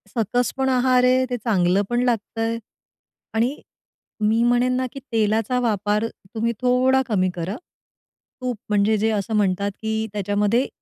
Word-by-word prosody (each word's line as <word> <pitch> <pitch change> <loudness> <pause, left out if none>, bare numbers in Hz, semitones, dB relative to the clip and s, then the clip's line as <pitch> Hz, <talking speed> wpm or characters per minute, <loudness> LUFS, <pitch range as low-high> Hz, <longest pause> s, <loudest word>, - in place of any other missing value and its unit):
सकस 235 +2 0
पण 265 0 +1
आहार 255 0 +3
आहे, 255 +1 +4
ते 245 - -1
चांगलं 195 -5 +2
पण 240 0 +1
लागतंय, 230 -1 -1 0.8
आणि 240 +6 0 0.6
मी 220 +2 +2
म्हणेन 245 +1 +3
ना 255 - 0
की 275 - -7
तेलाचा 225 +2 +1
वापर 210 -2 0 0.3
तुम्ही 230 +1 0
थोडा 255 +1 +3
कमी 185 -5 +1
करा. 175 +4 -3 0.9
तूप 250 -2 -2
म्हणजे 210 +1 +3
जे 220 +2 +1
असं 215 +1 -1
म्हणतात 200 -1 +1
की 220 0 -1
त्याच्यामध्ये 205 +5 +1
225 Hz, 145 wpm, -22 LUFS, 210-250 Hz, 0.9 s, आहे